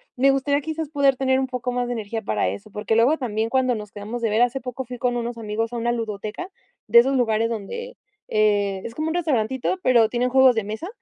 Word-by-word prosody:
me 270 +2 +4
gustaría 280 +1 +1
quizás 315 0 -4
poder 280 -3 +2
tener 260 -1 +2
un 265 - -1
poco 250 -1 -3
más 245 0 -1
de 245 - -2
energía 225 0 -4
para 105 -3 0
eso, 100 - -8
porque 210 +2 -1
luego 245 +8 +4
también 225 -4 -2
cuando 255 -1 +2
nos 210 -2 -7
quedamos 215 +4 -6
de 230 - +1
ver 220 +2 +2
hace 245 +2 0
poco 255 +1 -5
fui 250 +1 -7
con 245 0 0
unos 235 0 -4
amigos 225 +1 -3
a - - -2
una 235 +1 0
ludoteca 220 - -4 0.4
de 235 +3 +8
esos 265 +3 +3
lugares 225 -2 +1
donde, 470 - -5 0.3
eh, 205 -2 +1
es 230 - -7
como 310 +1 -2
un 320 - -2
restaurantito 265 -1 0
pero 235 -3 +5
tienen 245 +2 0
juegos 260 -1 +5
de 225 - 0
mesa, 220 +11 -5
240 Hz, 235 wpm, -23 LUFS, 220-265 Hz, 0.4 s, de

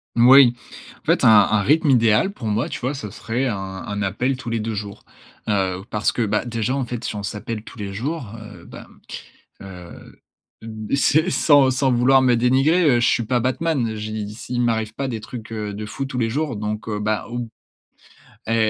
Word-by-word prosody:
Moui. 125 +1 +7 0.5
En - - -37
fait, - - +2
un - - +7
un 105 -1 +5
rythme 150 - +2
idéal 115 - +3
pour 120 - -7
moi, 105 +3 -1
tu - - -5
vois, 130 +3 -2
ce 110 -7 -6
serait 120 +6 -3
un 110 -5 -2
un 95 +2 -5
appel 125 +7 -1
tous 130 -4 -7
les 115 - -1
2 110 0 -3
jours. 100 -1 -7 0.4
Heu, 95 -2 0
parce 105 -4 0
que, 120 - -3
bah, 105 +3 -1
déjà, 115 +1 -2
en 135 -3 -1
fait, 120 -1 -6
si - - -4
on 100 - -5
s'appelle 105 +2 -5
tous 115 - -13
les 100 -1 -5
jours, 130 +2 -4
heu, 105 -5 -12
bah, - - -11 0.7
heu, 90 -3 -12 0.8
c'est 155 +5 +3
sans 145 -6 +4
sans 130 +1 +1
vouloir 130 +2 +4
me 125 -2 +3
dénigrer, 135 +9 +3
heu, - - +1
je 120 - +3
suis 120 - +2
pas 125 +2 +1
Batman. 130 -2 -1
J'ai 110 0 -5
dis, 105 - -8
s 110 - -11
il 125 -1 -1
m'arrive 110 -2 0
pas 135 - -3
des 115 - -4
trucs, 115 0 -9
heu, 105 -2 -4
de 105 +1 -6
fou 120 +6 -5
tous 130 -2 -4
les 115 -2 0
jours 145 +1 -2
donc, 105 +1 -4
heu, 105 -1 -2
bah, 105 0 -1
ou 120 -1 -4 1.0
elle 115 - 0
115 Hz, 210 wpm, -21 LUFS, 105-130 Hz, 1.0 s, Moui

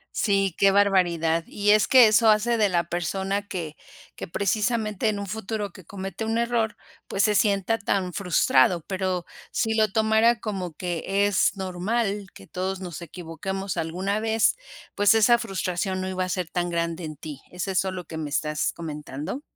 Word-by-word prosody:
Sí, 195 -4 +1
qué 195 0 +5
barbaridad. 175 -5 +2
Y 205 0 -2
es 215 0 +4
que 255 -4 +8
eso 215 +1 +5
hace 225 +2 +3
de 210 -2 +4
la 170 -2 +1
persona 195 +4 -2
que 165 -6 -5 0.4
que - - -7
precisamente 215 +3 0
en 210 -1 0
un 200 - -5
futuro 210 -1 -4
que 180 -3 -14
comete 195 +2 -6
un 225 +1 0
error, 235 -2 0 0.3
pues, 195 - 0
se 210 -1 +3
sienta 205 +2 +2
tan 195 -2 -1
frustrado, 175 -3 +3
pero, 185 -2 -2 0.3
si 225 -1 0
lo 215 -1 +3
tomara 220 +1 +3
como 190 -6 -4
que 180 +4 -1
es 200 -1 +2
normal, 195 +2 -2
que 95 - -13
todos 190 - -4
nos 175 -2 -7
equivoquemos 180 +3 -5
alguna 185 +6 -1
vez, 225 - +2 0.4
pues, 205 0 +4
esa 225 +2 +5
frustración 185 -2 -2
no 185 - -3
iba 185 0 -1
a - - -6
ser 180 -2 -2
tan 175 -1 -1
grande 170 0 -2
en 155 - -6
ti, 150 -1 -8
¿es 180 +2 -4
eso 190 0 0
lo 185 -1 -6
que 160 - -7
me 155 -2 -4
estás 150 +1 -1
comentando? 150 - -6
195 Hz, 180 wpm, -25 LUFS, 175-210 Hz, 0.4 s, que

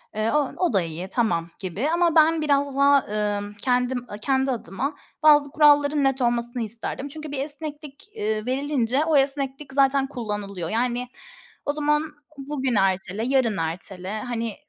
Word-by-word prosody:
eee, 215 +1 0
o 295 -3 +1
o 355 -10 +1
da 195 - +4
iyi, 170 +3 -5
tamam 175 -8 0
gibi 200 - -2
ama 340 -1 +2
ben 320 0 +5
biraz 280 -2 +1
daha, 280 0 +6
ımm, 205 -1 -2
kendim, 250 +3 0
a 205 - -7
kendi 265 +3 +1
adıma 250 - -3 0.3
bazı 295 -2 +6
kuralların 290 -1 +4
net 270 -1 +1
olmasını 240 0 0
isterdim. 230 +5 -4
Çünkü 305 +1 -7
bir 280 - -3
esneklik, 295 +3 -8
eee, 215 +1 -2
verilince 270 +1 0
o 315 -3 +3
esneklik 270 0 -1
zaten 275 0 +3
kullanılıyor. 205 - -4
Yani 245 +2 0 0.6
o 290 - 0
zaman 300 0 +1 0.3
bugün 270 -3 -2
ertele, 195 +1 0
yarın 255 -5 +2
ertele, 185 +5 -4
hani, 230 -2 -3
260 Hz, 155 wpm, -24 LUFS, 215-285 Hz, 0.6 s, daha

